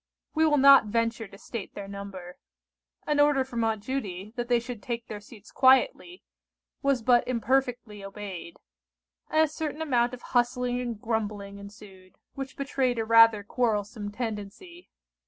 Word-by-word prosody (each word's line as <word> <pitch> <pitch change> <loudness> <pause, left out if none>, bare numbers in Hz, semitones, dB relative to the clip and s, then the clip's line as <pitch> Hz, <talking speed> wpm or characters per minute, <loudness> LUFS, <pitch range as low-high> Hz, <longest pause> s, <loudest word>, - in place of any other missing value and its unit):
We 320 0 +3
will 295 -1 +3
not 275 -3 +8
venture 230 0 -1
to 195 - -14
state 220 0 -7
their 200 - -7
number. 195 -3 -9 0.7
An 295 -1 0
order 290 -2 +4
from 240 -3 -3
Aunt 220 -2 -1
Judy, 210 -5 -5
that 240 -1 -3
they 240 -1 +3
should 240 -2 -8
take 235 +1 -4
their 210 - -7
seats 210 0 -15
quietly, 350 - +3 0.6
was 275 -4 +1
but 240 0 +4
imperfectly 245 -3 -1
obeyed; 195 -4 -8 0.7
and 310 - +3
a 315 - +4
certain 305 0 -5
amount 250 -5 +1
of 245 - -18
hustling 245 0 +1
and 235 -4 -4
grumbling 210 -3 -3
ensued, 200 -2 -14 0.2
which 270 -1 -7
betrayed 270 -3 -1
a 225 - -1
rather 230 -2 +6
quarrelsome 210 -2 -2
tendency. 230 - -7
235 Hz, 155 wpm, -27 LUFS, 205-260 Hz, 0.7 s, not